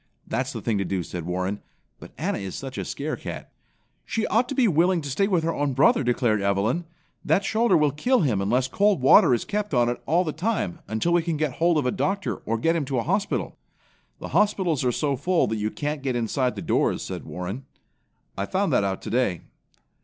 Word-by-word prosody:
"That's - - -2
the - - -6
thing 110 -3 0
to - - +1
do," 95 -1 -2
said 85 0 -6
Warren, 95 +3 -2 0.4
"but - - -12
Anna - - -2
is 95 -2 -6
such 135 -1 -6
a - - -3
scare 150 +2 -3
cat." - - -8 0.5
"She 225 - -2
ought 235 +3 +1
to 275 - -3
be 255 -4 +4
willing 175 +1 +3
to 145 -2 -5
stay 195 +9 +1
with 180 -5 +1
her 165 0 0
own 145 -2 -1
brother!" 135 +1 +4
declared 120 -4 +1
Evelyn. 100 - 0 0.4
"That 170 +6 +2
shoulder 220 -4 +3
will 150 -2 +3
kill 245 - +1
him 120 - +1
unless 125 +6 +1
cold 200 +6 +2
water 130 0 +6
is 120 - +1
kept 210 -6 -2
on 120 -1 +3
it 120 - -3
all 170 +5 +3
the 160 - -2
time, 195 -1 -2
until 110 +11 0
we 175 - +4
can 165 -1 -2
get 155 -2 0
hold 170 0 +3
of 145 - 0
a 125 - +2
doctor 195 +7 -1
or 115 +1 0
get 165 +8 +1
him 165 - 0
to 135 -1 -2
a 115 - 0
hospital." 195 +4 -1 0.6
"The - - -7
hospitals 185 -9 +1
are 125 - +2
so 140 +2 0
full 170 +7 +1
that 110 - -2
you 105 0 -1
can't 150 +4 -4
get 135 -2 -2
inside 125 +2 0
the - - -6
doors," - - +1
said - - -6
Warren. 95 +9 -6 0.7
"I 100 0 -3
found 195 +1 0
that - - +3
out 95 -1 -2
today." 115 -9 0
145 Hz, 225 wpm, -25 LUFS, 115-175 Hz, 0.7 s, water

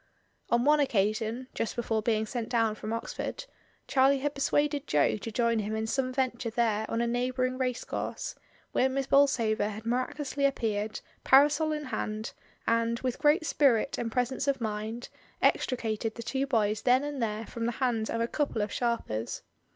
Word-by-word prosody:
On 235 +1 +2
one 300 +1 +5
occasion 225 0 0
(just 230 - -2
before 225 -2 0
being 220 0 +1
sent 230 0 -4
down 225 -3 +2
from 215 0 -6
Oxford) 230 - -4 0.4
Charlie 270 +1 +4
had 285 +2 -2
persuaded 290 +1 0
Jo 145 -1 +3
to 225 +2 -6
join 230 0 +1
him 215 +1 -2
in 220 0 -1
some 255 +3 -1
venture 255 -2 -1
there 220 -2 0
on 230 - 0
a - - +1
neighbouring 255 +2 -1
racecourse, 250 -2 -3 0.4
where 260 - +2
Miss 270 +1 -1
Bolsover 235 -7 +3
had 215 +1 -8
miraculously 260 +4 -1
appeared, 220 -5 -1 0.2
parasol 295 +3 +5
in 300 -1 -2
hand, 215 -5 -4 0.3
and, 230 0 +1
with 255 -2 -2
great 300 +2 +3
spirit 275 -4 +2
and 230 -1 -2
presence 250 +3 -1
of 275 -2 +1
mind, 220 +2 -4 0.3
extricated 225 -3 0
the 235 - -6
two 270 +3 -1
boys 215 -5 +1
then 255 +2 +4
and 290 -3 -4
there 220 0 -2
from 230 +1 -4
the 240 - -1
hands 230 -3 0
of 230 - -1
a 230 - +1
couple 280 -6 -1
of 210 - -4
sharpers. 120 - -2
235 Hz, 175 wpm, -29 LUFS, 220-265 Hz, 0.4 s, one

